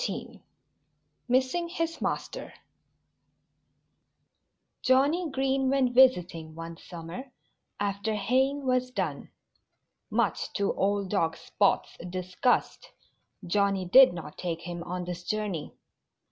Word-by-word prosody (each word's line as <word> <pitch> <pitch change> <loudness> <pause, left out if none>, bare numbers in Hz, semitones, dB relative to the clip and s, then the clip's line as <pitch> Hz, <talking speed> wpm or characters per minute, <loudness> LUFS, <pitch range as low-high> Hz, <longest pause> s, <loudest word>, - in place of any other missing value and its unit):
XIV - - -5 0.9
MISSING 260 +7 +1
HIS 330 -1 -3
MASTER - - -3 2.3
Johnnie 285 +7 +3
Green 270 -1 +1
went 260 -2 +2
visiting 180 -11 +3
one 165 0 -7
summer, 175 +12 -9 0.5
after 205 +2 -1
haying 265 +7 +1
was 255 0 +1
done. 180 - -3 0.8
Much - - 0
to 200 0 0
old 200 -1 0
dog 165 -5 +1
Spot's 200 - 0
disgust, 185 +6 0 0.6
Johnnie 195 +1 +1
did 260 +7 +8
not 165 -3 -8
take 170 -2 -3
him 175 0 -6
on 180 0 -4
this 175 0 -5
journey. 205 -7 -3
205 Hz, 105 wpm, -28 LUFS, 175-260 Hz, 2.3 s, did